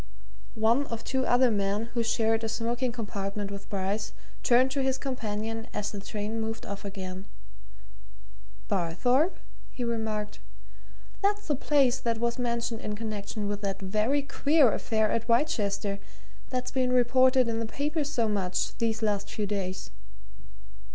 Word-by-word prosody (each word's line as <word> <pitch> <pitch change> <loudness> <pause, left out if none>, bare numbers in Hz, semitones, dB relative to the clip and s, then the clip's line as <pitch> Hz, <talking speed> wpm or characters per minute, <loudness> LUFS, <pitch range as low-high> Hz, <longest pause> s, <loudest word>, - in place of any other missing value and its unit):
One 230 +6 +3
of 230 -1 -5
two 260 -1 0
other 245 0 +5
men 205 +2 0
who 235 - +1
shared 225 0 +2
a 225 - -1
smoking 235 +2 -1
compartment 205 -3 -4
with 200 0 -8
Bryce 200 +2 -2 0.3
turned 255 +2 +4
to 275 0 0
his 265 0 +1
companion 225 -4 -3
as 210 0 -1
the 205 - -5
train 210 +2 -3
moved 225 0 -4
off 200 0 -6
again. 190 -1 -6 1.4
"Barthorpe?" 245 - +2 0.3
he 250 - -5
remarked. 220 -3 -2 0.8
"That's 410 +1 +1
the 295 - +1
place 270 -2 +3
that 230 -1 0
was 235 +2 -1
mentioned 235 -1 -1
in 210 - -3
connection 210 -1 -4
with 205 0 -2
that 195 -2 -2
very 215 +9 +1
queer 285 -2 +4
affair 220 -1 +1
at 230 +1 -1
Wrychester, 205 -6 +1 0.5
that's 250 -1 -2
been 255 -2 +1
reported 255 +1 +5
in 225 -1 -1
the 230 - -2
papers 290 +3 -1
so 235 -6 +1
much 190 -3 0
these 225 -1 0
last 205 -1 0
few 210 - -2
days. 190 -2 -3
225 Hz, 150 wpm, -29 LUFS, 205-250 Hz, 1.4 s, other